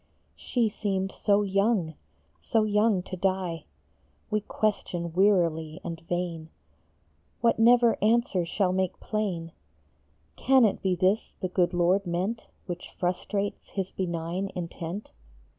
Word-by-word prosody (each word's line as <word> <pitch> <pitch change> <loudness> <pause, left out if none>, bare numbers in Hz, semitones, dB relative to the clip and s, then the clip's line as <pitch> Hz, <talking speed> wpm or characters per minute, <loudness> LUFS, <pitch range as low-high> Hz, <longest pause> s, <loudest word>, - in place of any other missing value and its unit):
She 240 -3 0
seemed 195 -2 -2
so 205 0 +2
young, 195 -3 +1 0.5
so 225 -2 +1
young 210 -2 +2
to 185 - -6
die! 185 -3 -1 0.7
We 215 0 +1
question 175 -6 -2
wearily 170 -5 +2
and 165 -1 -5
vain 165 -1 -3 0.9
What 230 -1 +3
never 235 0 +5
answer 220 -4 +2
shall 180 +2 0
make 185 -1 -1
plain: 185 -6 -2 0.4
" - - -40
Can 265 -2 +6
it 210 - 0
be 185 -2 +1
this 190 +5 +1
the 185 - -2
good 180 -1 +1
Lord 180 +3 +2
meant 190 +7 -2 0.2
Which 175 -2 -6
frustrates 200 +3 -2
his 195 -2 -3
benign 175 +1 -3
intent? 170 +2 -5
190 Hz, 125 wpm, -27 LUFS, 175-210 Hz, 0.9 s, Can